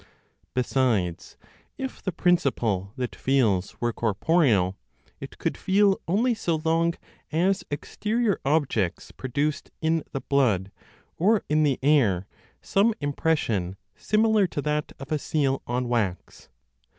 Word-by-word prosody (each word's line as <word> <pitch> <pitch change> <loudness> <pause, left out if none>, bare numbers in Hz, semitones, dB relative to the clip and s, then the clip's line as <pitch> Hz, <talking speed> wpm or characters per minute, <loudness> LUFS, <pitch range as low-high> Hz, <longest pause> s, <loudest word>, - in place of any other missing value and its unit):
Besides, 120 -9 0 0.4
if 265 -1 -5
the 190 - -2
principle 125 - +1
that 125 -2 -4
feels 110 -9 +1
were 120 -1 0
corporeal, 110 - +2 0.4
it - - -9
could - - -2
feel 195 0 +2
only 225 +8 +2
so 170 -7 -1
long 165 +1 +2 0.4
as 185 +5 +1
exterior 215 +9 -1
objects 135 - 0
produced 140 +3 -2
in 160 -1 +1
the 135 - -4
blood 110 -9 +1 0.5
or 210 +5 +3
in 155 +1 +3
the 145 -4 +2
air 120 -11 +3 0.4
some 210 +3 +2
impression 135 - -1 0.2
similar 215 -2 +2
to 145 - -4
that 150 0 -1
of 135 +2 -9
a 155 - +1
seal 135 -3 0
on 125 +1 -1
wax. 110 -7 -2
145 Hz, 125 wpm, -25 LUFS, 115-170 Hz, 0.5 s, or